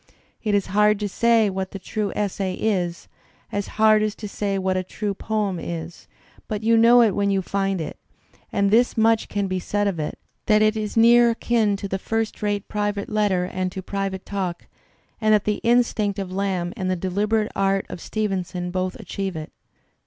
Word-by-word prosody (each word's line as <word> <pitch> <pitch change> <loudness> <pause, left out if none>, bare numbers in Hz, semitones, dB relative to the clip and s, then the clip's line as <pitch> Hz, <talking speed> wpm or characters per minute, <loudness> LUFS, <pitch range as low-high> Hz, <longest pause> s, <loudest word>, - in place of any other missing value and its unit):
It 210 -2 +1
is 200 - +1
hard 210 0 +4
to 205 - 0
say 230 +2 +3
what 190 -1 -3
the 195 - -7
true 205 +1 -3
essay 195 -2 -1
is, 180 -5 -1 0.4
as 205 -1 -2
hard 215 0 +5
as 215 0 -1
to 210 - -7
say 200 -1 -2
what 190 -1 0
a 185 - 0
true 205 +2 -3
poem 205 -3 -2
is, 165 0 -6 0.4
but 215 -1 -3
you 230 +1 +4
know 235 +2 +7
it 220 - +3
when 200 +1 0
you 195 -1 +1
find 195 0 -1
it; 155 - -6 0.5
and 200 -1 +1
this 240 +2 +3
much 225 0 +3
can 205 -1 -1
be 185 -1 -2
said 205 +3 -1
of 185 -5 -2
it, 150 - -3 0.3
that 215 0 +5
it 215 0 +3
is 215 0 -3
near 235 +1 +6
akin 225 -2 +1
to 200 - -5
the 195 0 -3
first 225 +2 -2
rate 205 -1 -1
private 205 -1 -2
letter 205 -4 +1
and 185 0 -3
to 190 - -6
private 195 -1 -3
talk, 185 -4 -3 0.6
and 215 0 +5
that 210 - +1
the 210 -1 -1
instinct 230 -4 +2
of 195 -2 -4
Lamb 185 -2 -1
and 185 -1 -2
the 185 - +1
deliberate 205 +4 0
art 195 0 +1
of 170 - -8
Stevenson 185 -4 -3
both 185 0 -2
achieve 195 -2 -4
it. 155 -1 -6
200 Hz, 195 wpm, -23 LUFS, 190-215 Hz, 0.6 s, know